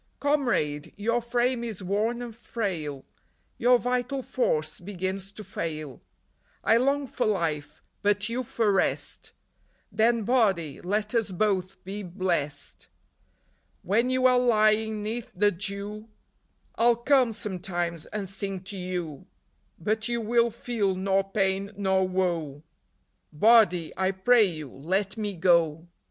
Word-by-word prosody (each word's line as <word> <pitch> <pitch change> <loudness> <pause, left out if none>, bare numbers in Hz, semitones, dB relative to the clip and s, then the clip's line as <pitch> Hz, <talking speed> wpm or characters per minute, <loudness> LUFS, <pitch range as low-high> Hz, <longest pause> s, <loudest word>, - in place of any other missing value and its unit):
" - - -43
Comrade! 245 - 0
your 230 +3 0
frame 240 +1 0
is 215 -5 -5
worn 220 +6 0
and 235 -2 -8
frail; 175 - -4 0.5
Your 245 +1 +5
vital 250 +2 -1
force 155 -13 -1
begins 190 +1 -4
to 215 - -9
fail; 155 -7 -5 0.6
I 225 - +5
long 275 +3 +2
for 250 - -1
life, 155 -7 -2 0.2
but 205 0 +1
you 235 +2 -2
for 225 -3 0
rest; 195 - 0 0.6
Then, 230 0 +2
Body, 195 - +1
let 210 +4 -1
us 225 -3 +1
both 185 -1 -1
be 200 +3 -5
blest. 170 -6 -3 1.0
When 230 +6 +2
you 255 0 +1
are 250 -1 +6
lying 215 -2 +2
'neath 225 +2 -4
the 205 +3 +3
dew 200 +3 -4 0.6
I 230 - +1
'll 240 - +6
come, 250 0 +3
sometimes, 175 -6 -3
and 205 -2 -4
sing 195 0 -4
to 195 +1 -8
you; 180 -5 -5 0.5
But 215 +5 -1
you 235 0 -1
will 235 +1 +2
feel 220 -4 -1
nor 195 +1 0
pain 195 0 0
nor 190 -2 +2
woe; 170 -6 -1 0.7
Body, 180 -2 +4
I 190 0 +1
pray 215 +4 +4
you, 155 -7 -5
let 190 +8 -1
me 205 -4 -3
go! 165 -2 +3
200 Hz, 135 wpm, -27 LUFS, 180-230 Hz, 1.0 s, are